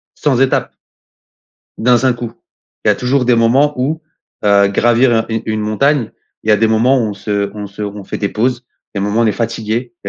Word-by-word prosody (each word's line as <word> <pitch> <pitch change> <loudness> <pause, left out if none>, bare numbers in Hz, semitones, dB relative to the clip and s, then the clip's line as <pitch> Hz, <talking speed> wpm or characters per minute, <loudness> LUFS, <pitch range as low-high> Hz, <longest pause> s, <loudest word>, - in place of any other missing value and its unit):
sans 135 -4 +1
étape 135 - +1 1.1
d'un 120 +1 +4
seul 130 0 +2
coup. 120 -1 -6 0.5
Il - - +2
y - - +7
a - - +4
toujours 125 +1 0
des 125 - +4
moments 125 +5 +2
où, 150 +6 -1 0.4
heu, 100 -1 +4
gravir 120 +4 +3
un 110 0 +1
une 110 -1 -2
une 110 -1 -1
montagne, 115 +4 +1 0.3
il 110 - -7
y - - +7
a - - +5
des 110 +2 +2
moments 115 +5 +3
où 110 -3 0
on - - -6
se 100 -1 -2
on 105 -1 -6
se 100 +1 -8
on 105 0 -5
fait - - -5
des 100 -2 -1
pauses, 125 +2 -1 0.3
des 100 - -2
moments, 105 +3 0
on - - +3
est 110 - +2
fatigué, 115 +2 -3
il - - -3
115 Hz, 225 wpm, -16 LUFS, 105-125 Hz, 1.1 s, y